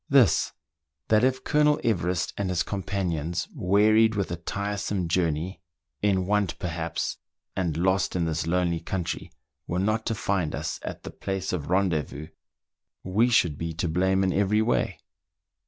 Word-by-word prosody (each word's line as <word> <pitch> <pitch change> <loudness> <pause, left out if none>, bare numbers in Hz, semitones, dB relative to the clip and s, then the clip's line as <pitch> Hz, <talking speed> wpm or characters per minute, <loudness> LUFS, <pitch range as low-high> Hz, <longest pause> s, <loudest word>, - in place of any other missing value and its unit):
This: 135 -6 +4 0.3
— 70 0 -59
that 110 +1 +4
if 130 0 +2
Colonel 150 0 +3
Everest 90 -6 0
and 100 -2 -2
his 90 -2 +1
com 100 -1 -3
panions, 85 -4 -2
wearied 110 +1 +4
with 100 -3 -1
a - - -1
tiresome 100 +1 -2
journey, 85 +1 0 0.4
in 95 -3 +2
want 100 -2 +1
perhaps, 85 -3 -3 0.4
and 85 -5 -1
lost 95 +2 +1
in 85 -2 +1
this 80 0 -1
lonely 85 -1 +1
country, 85 +1 -4 0.4
were 85 - -1
not 110 +4 0
to 115 - 0
find 95 -6 -1
us - - -3
at - - -6
the - - -7
place 95 -1 -3
of 75 -4 -3
rendezvous, 80 -5 0 0.7
we 105 +6 +2
should 85 -11 +3
be 80 0 -3
to 85 +2 -2
blame 95 +4 +2
in 95 -1 +1
every 105 +2 +2
way. 120 - 0
95 Hz, 160 wpm, -26 LUFS, 85-100 Hz, 0.7 s, This